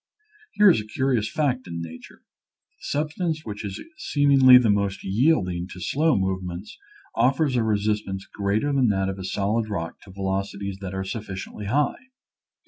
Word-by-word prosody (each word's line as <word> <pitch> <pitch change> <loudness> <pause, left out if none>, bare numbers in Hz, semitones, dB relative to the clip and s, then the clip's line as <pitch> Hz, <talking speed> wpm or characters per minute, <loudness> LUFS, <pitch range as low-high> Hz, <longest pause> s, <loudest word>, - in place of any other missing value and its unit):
Here 205 -2 +7
is 110 - +1
a 105 - -11
curious 120 -1 0
fact 130 -4 -1
in 85 -1 -5
nature; 80 0 -10 0.6
the - - -12
sub 150 +1 -1
stance 160 -2 -3
which 105 -2 -6
is 100 -2 -5 0.2
seemingly 135 -3 +6
the 120 -4 +4
most 100 -1 -1
yielding 95 - +1
to 90 - -10
slow 150 - +1
movements 95 0 -3 0.4
offers 135 +1 +2
a 120 - +3
resistance 105 -2 -1
greater 105 +8 -1
than 135 -3 +3
that 95 -2 +1
of 95 0 -5
a - - -5
solid 105 +4 -1
rock 85 -5 -4
to 95 - -14
velocities 95 +1 -3
that 95 -1 -5
are 95 - -2
sufficiently 100 0 -6
high. 145 - 0
105 Hz, 165 wpm, -24 LUFS, 95-130 Hz, 0.6 s, Here